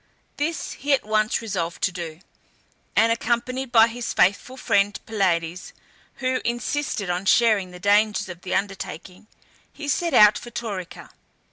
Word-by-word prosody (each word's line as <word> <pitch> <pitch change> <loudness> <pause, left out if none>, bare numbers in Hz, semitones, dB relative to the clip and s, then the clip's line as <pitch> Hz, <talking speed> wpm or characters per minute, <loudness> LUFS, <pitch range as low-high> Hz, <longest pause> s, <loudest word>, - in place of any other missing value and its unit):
This 315 +3 -2
he 285 +1 -1
at 270 - +1
once 215 +2 +1
resolved 175 -6 -3
to 185 - +2
do, 170 -2 -7 0.7
and 225 +1 +4
accompanied 240 +3 -1
by 225 -2 +7
his 235 +1 -4
faithful 205 +7 +1
friend 205 -5 +1
Pylades, 180 -5 -1 0.4
who 255 0 -1
insisted 240 -4 -2
on 180 +2 -3
sharing 215 -6 +4
the 180 0 -11
dangers 205 +1 +2
of 175 -1 -9
the 185 - -3
undertaking, 195 -1 -5 0.4
he 295 - -8
set 335 +1 0
out 210 -1 +7
for 240 - -10
Taurica. 200 -7 -6
215 Hz, 145 wpm, -23 LUFS, 185-240 Hz, 0.7 s, by